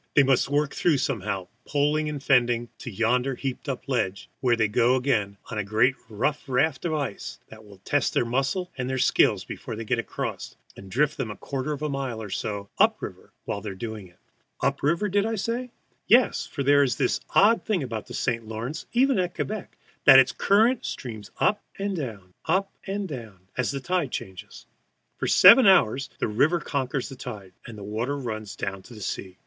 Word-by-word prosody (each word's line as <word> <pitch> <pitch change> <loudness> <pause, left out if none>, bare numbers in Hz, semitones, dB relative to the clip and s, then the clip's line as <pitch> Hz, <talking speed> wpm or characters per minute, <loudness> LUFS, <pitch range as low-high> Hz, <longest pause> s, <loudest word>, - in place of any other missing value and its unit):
They 140 - +7
must 135 0 +2
work 145 0 +1
through 165 -5 +2
somehow, 105 -8 -2 0.2
poling 150 +1 +1
and 145 -2 -5
fending, 120 -3 +2
to 125 - -6
yonder 125 +5 +1
heaped 135 +2 -5
up 135 - -4
ledge, 115 -8 -2
where 125 -2 +2
up - - +2
they 110 -1 +3
go 120 +4 +3
again 115 -7 0
on 110 - -2
a - - 0
great 110 +6 +3 0.2
rough 145 +7 -1
raft 135 +4 +1
of 165 - 0
ice 140 -9 -4
that 110 0 -13
will 105 -2 -15
test 145 -1 +1
their - - +2
muscles 135 +9 -1
and 125 -1 -3
their 130 - -1
skill - - +4
before - - -6
they 115 +1 -6
get 120 +2 0
across, 115 - -5 0.2
and 95 - -11
drift 145 +8 +1
them 130 -5 -3
a 105 - -6
quarter 135 +1 -4
of 150 0 -4
a - - +1
mile 135 -5 -3
or 105 -3 -7
so 100 0 -3
up - - +5
stream - - -8 0.2
while 100 - -3
they 105 - -5
are 95 - -7
doing 110 -1 -6
it. 85 - -24 0.4
Up 140 0 +1
stream, 170 +8 +1
did 200 +1 +3
I 225 - -1
say? 235 +4 -2 0.4
Yes, 245 +3 +4
for 140 - -4
there 145 +1 +5
is 135 -3 +2
this - - 0 0.2
odd 220 +4 +5
thing 200 -8 0
about 115 -4 -5
the - - -7
St. 115 -3 -1
Lawrence, 115 +8 -5
even 260 -2 +3
at 180 -1 -1
Quebec, 215 -1 -5 0.3
that 135 - +10
its 130 -1 +6
current 225 +5 +3
streams 110 -6 -6
up 205 - +2 0.2
and 200 0 -2
down, 105 - -6
up 190 +4 +1 0.2
and 200 0 -2
down, 115 - -8
as 130 -2 0
the 140 - -2
tide 170 0 -1
changes. 95 -5 -8 0.5
For - - -1
seven 200 +5 +8
hours 140 - +4
the - - -1
river 145 +11 +2
conquers 135 -3 -2
the 135 - -9
tide, 105 -7 -8
and 115 -2 -9
the 100 - -8
water 115 +7 -2
runs 110 -6 -5
down 95 -1 -4
to 110 +2 -13
sea. 95 -1 -5
130 Hz, 210 wpm, -25 LUFS, 110-150 Hz, 0.5 s, that